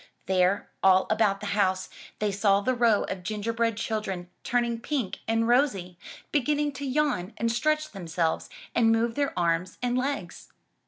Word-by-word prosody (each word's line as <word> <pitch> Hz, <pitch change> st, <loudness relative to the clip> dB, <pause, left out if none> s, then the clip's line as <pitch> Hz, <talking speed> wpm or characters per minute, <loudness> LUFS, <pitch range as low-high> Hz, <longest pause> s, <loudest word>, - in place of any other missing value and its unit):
There, 185 Hz, +1 st, +1 dB
all 190 Hz, 0 st, +5 dB
about 215 Hz, -2 st, +2 dB
the -, -, -5 dB
house, 190 Hz, -2 st, +1 dB, 0.3 s
they 210 Hz, -1 st, 0 dB
saw 200 Hz, 0 st, +3 dB
the 255 Hz, +5 st, +1 dB
row 235 Hz, -4 st, +3 dB
of 185 Hz, -, -5 dB
gingerbread 225 Hz, +3 st, -1 dB
children 195 Hz, -6 st, -3 dB
turning 240 Hz, -2 st, 0 dB
pink 250 Hz, -5 st, -2 dB
and 225 Hz, 0 st, +1 dB
rosy, 205 Hz, -9 st, +1 dB, 0.3 s
beginning 295 Hz, +1 st, +1 dB
to 280 Hz, +1 st, -6 dB
yawn 260 Hz, -9 st, 0 dB
and 230 Hz, 0 st, 0 dB
stretch 305 Hz, +6 st, 0 dB
themselves 170 Hz, -4 st, -2 dB, 0.2 s
and 225 Hz, -1 st, +4 dB
move 230 Hz, +1 st, +2 dB
their 285 Hz, +2 st, 0 dB
arms 170 Hz, +1 st, 0 dB
and 245 Hz, 0 st, -1 dB
legs. 275 Hz, +3 st, -3 dB
225 Hz, 155 wpm, -27 LUFS, 190-245 Hz, 0.3 s, all